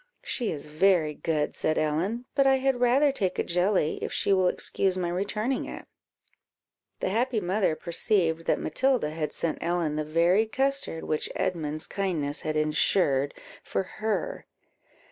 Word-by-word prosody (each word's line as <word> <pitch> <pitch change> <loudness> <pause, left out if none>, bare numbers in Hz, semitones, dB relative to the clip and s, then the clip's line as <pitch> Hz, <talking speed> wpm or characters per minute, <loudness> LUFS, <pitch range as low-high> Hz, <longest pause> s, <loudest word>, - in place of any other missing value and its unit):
"She 240 -4 -2
is 145 -3 -5
very 155 0 +2
good," 150 0 -1
said 155 - 0
Ellen, 175 +11 -1
"but 275 -1 +3
I 270 - +5
had 265 -1 +1
rather 265 +4 +4
take 190 -9 -1
a - - +1
jelly, 180 -2 +1
if - - -3
she 200 - +2
will 185 -1 +3
excuse 185 +1 0
my 175 -2 -1
returning 210 +8 -1
it." - - -8 1.2
The - - 0
happy 235 +3 +1
mother 185 -2 +1
perceived 170 -1 0
that - - +2
Matilda 260 - +1
had 155 -1 -3
sent 165 - -2
Ellen 170 -3 0
the 155 - 0
very 170 +7 +3
custard 270 -7 -1
which 155 - -2
Edmund's 155 -4 -2
kindness 165 -7 -2
had 155 -1 -2
ensured 150 -2 +2 0.3
for - - -1
her. 220 - -3
180 Hz, 155 wpm, -27 LUFS, 155-220 Hz, 1.2 s, I